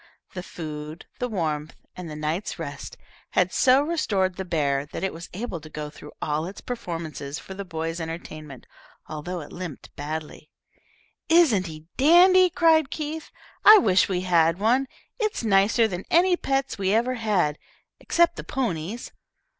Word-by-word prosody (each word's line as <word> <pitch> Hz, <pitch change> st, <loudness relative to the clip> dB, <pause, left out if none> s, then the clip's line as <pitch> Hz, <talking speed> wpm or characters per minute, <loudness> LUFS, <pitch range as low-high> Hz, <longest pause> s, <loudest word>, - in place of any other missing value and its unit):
The 180 Hz, -, -5 dB
food, 155 Hz, -2 st, -7 dB
the 250 Hz, -, -2 dB
warmth, 155 Hz, -7 st, -2 dB, 0.2 s
and 180 Hz, -2 st, -7 dB
the 150 Hz, -, -7 dB
night's 155 Hz, +6 st, -3 dB
rest -, -, -7 dB, 0.4 s
had -, -, +2 dB
so 265 Hz, +1 st, +5 dB
restored 205 Hz, -, 0 dB
the 190 Hz, -, -4 dB
bear 145 Hz, -6 st, 0 dB
that -, -, -6 dB
it 190 Hz, -, -1 dB
was 170 Hz, +1 st, -9 dB
able 185 Hz, -4 st, -5 dB
to 155 Hz, -, -11 dB
go 150 Hz, -1 st, -6 dB
through 150 Hz, 0 st, -12 dB
all 155 Hz, +2 st, -1 dB
its 195 Hz, -, -8 dB
performances 165 Hz, -, -5 dB
for 190 Hz, -, -9 dB
the 200 Hz, +1 st, -6 dB
boys' 165 Hz, -2 st, -4 dB
entertainment, 155 Hz, -4 st, -8 dB, 0.4 s
although 165 Hz, +3 st, -5 dB
it 145 Hz, -, -11 dB
limped 175 Hz, -6 st, -8 dB
badly. 155 Hz, +1 st, -6 dB, 0.8 s
"Isn't 290 Hz, -, +4 dB
he 155 Hz, -1 st, -7 dB
a 160 Hz, +3 st, -21 dB
dandy?" 360 Hz, +6 st, +6 dB
cried 320 Hz, -4 st, +3 dB
Keith; 310 Hz, +1 st, -5 dB, 0.3 s
"I 430 Hz, +1 st, +10 dB
wish 190 Hz, -, +3 dB
we 180 Hz, -2 st, 0 dB
had 170 Hz, -2 st, +3 dB
one. 245 Hz, +7 st, +2 dB, 0.3 s
It's 430 Hz, -, -1 dB
nicer 215 Hz, +2 st, +4 dB
than 185 Hz, -2 st, -5 dB
any 355 Hz, +2 st, +4 dB
pets 270 Hz, -8 st, -2 dB
we 190 Hz, -1 st, +1 dB
ever 240 Hz, +3 st, +1 dB
had, 205 Hz, -11 st, 0 dB, 0.4 s
except 340 Hz, 0 st, +2 dB
the -, -, -5 dB
ponies. 215 Hz, -3 st, -3 dB
185 Hz, 160 wpm, -25 LUFS, 160-255 Hz, 0.8 s, I